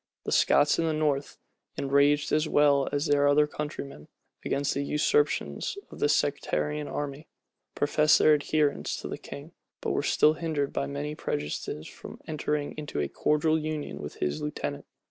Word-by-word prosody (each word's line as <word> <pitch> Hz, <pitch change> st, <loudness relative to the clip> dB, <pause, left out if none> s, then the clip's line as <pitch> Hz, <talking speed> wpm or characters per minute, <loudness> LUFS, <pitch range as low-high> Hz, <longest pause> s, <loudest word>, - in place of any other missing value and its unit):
The -, -, -4 dB
Scots 145 Hz, +2 st, +4 dB
in 165 Hz, -, +2 dB
the 160 Hz, -, +1 dB
north, 150 Hz, -2 st, -1 dB, 0.4 s
enraged, 140 Hz, +2 st, +2 dB
as 155 Hz, +1 st, +2 dB
well 145 Hz, -2 st, +4 dB
as 145 Hz, +2 st, 0 dB
their 145 Hz, -2 st, +3 dB
other 145 Hz, +1 st, +5 dB
countrymen, 145 Hz, -, -6 dB, 0.4 s
against 140 Hz, +1 st, 0 dB
the 140 Hz, -, -1 dB
usurpations 395 Hz, -, 0 dB
of -, -, -11 dB
the 145 Hz, -, +2 dB
sectarian 150 Hz, 0 st, 0 dB
army, 145 Hz, +1 st, -5 dB, 0.5 s
professed 150 Hz, +1 st, +4 dB
their 155 Hz, -, +5 dB
adherence 150 Hz, 0 st, 0 dB
to -, -, -5 dB
the -, -, -6 dB
king; 145 Hz, +4 st, -9 dB, 0.3 s
but -, -, -2 dB
were -, -, +1 dB
still 155 Hz, -, +4 dB
hindered 155 Hz, -3 st, -2 dB
by -, -, -1 dB
many 145 Hz, +1 st, -4 dB
prejudices 75 Hz, -, -4 dB
from -, -, -11 dB
entering 150 Hz, -1 st, -2 dB
into 150 Hz, -, -4 dB
a 75 Hz, -, 0 dB
cordial 155 Hz, -, +1 dB
union 155 Hz, -1 st, -4 dB
with 75 Hz, -, -7 dB
his 75 Hz, 0 st, -2 dB
lieutenant. 150 Hz, 0 st, -4 dB
145 Hz, 165 wpm, -28 LUFS, 140-150 Hz, 0.5 s, other